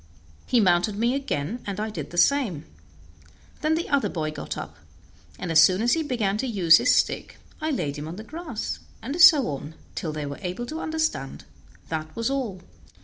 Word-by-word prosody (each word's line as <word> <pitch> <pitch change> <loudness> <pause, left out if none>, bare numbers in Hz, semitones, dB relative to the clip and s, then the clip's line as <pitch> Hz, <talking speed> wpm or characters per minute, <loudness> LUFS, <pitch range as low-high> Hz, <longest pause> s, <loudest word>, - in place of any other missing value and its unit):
He 245 - +3
mounted 185 +1 +3
me 235 +3 +2
again, 235 - -3
and 200 0 -4
I 215 +1 -2
did - - -6
the 175 - -9
same. 185 - +2 1.0
Then 315 0 +2
the 335 - -2
other 280 -2 +1
boy 155 -3 -3
got - - -6
up, - - -7 0.6
and 170 - -4
as 160 -1 +7
soon 185 +3 +5
as 240 - +3
he 325 - +1
began 220 -9 -1
to 265 - -1
use 175 -8 +6
his - - +3
stick - - 0 0.2
I 310 - -1
laid 160 - -2
him 150 - -6
on 165 - -6
the 215 - -8
grass, 310 -4 -5 0.2
and 280 +9 -2
so 315 -7 +8
on, 145 +2 -6 0.2
till 160 - -3
they 150 -1 -4
were 140 0 -6
able 185 +5 -4
to 315 +6 -5
understand 315 - -2 0.4
that 155 -1 -4
was 230 +3 -1
all. 235 -10 -3
210 Hz, 200 wpm, -25 LUFS, 165-275 Hz, 1.0 s, so